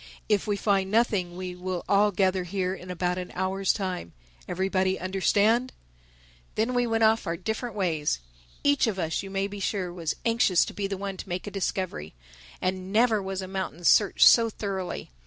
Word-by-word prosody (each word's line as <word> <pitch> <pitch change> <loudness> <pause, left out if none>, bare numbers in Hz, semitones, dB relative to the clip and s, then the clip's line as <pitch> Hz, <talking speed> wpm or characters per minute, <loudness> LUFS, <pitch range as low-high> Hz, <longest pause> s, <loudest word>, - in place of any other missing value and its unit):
If 210 -2 +1
we 205 -1 0
find 195 -2 +1
nothing 200 -5 +1
we 185 -1 -5
will 180 0 -4
all 205 +1 +4
gather 190 -1 +1
here 185 +1 -2
in 180 -1 -9
about 180 0 -1
an 180 - -6
hour's 190 +1 +1
time—Everybody 185 - -3
understand?" 205 +6 +2 0.8
Then 225 +4 0
we 245 0 +2
all - - -4
went 225 0 +2
off 220 +1 +3
our 165 0 -1
different 220 +3 -4
ways. 165 - 0 0.5
Each 285 -3 +3
of 210 -4 -1
us, 165 -3 -1
you 195 - -8
may 195 0 -1
be 200 0 -6
sure, 190 -2 -2
was 165 -3 -3
anxious 230 -6 +3
to - - -8
be 200 -1 -2
the 195 -1 -4
one 195 0 -5
to - - -8
make 180 +1 -3
a 205 - -6
discovery. 185 - -3 0.4
And 185 0 -2
never 220 0 +3
was 190 0 -4
a - - -6
mountain 190 -3 -5
searched 200 +3 +6
so 230 -1 +6
thoroughly. 195 - -5
190 Hz, 190 wpm, -27 LUFS, 180-205 Hz, 0.8 s, searched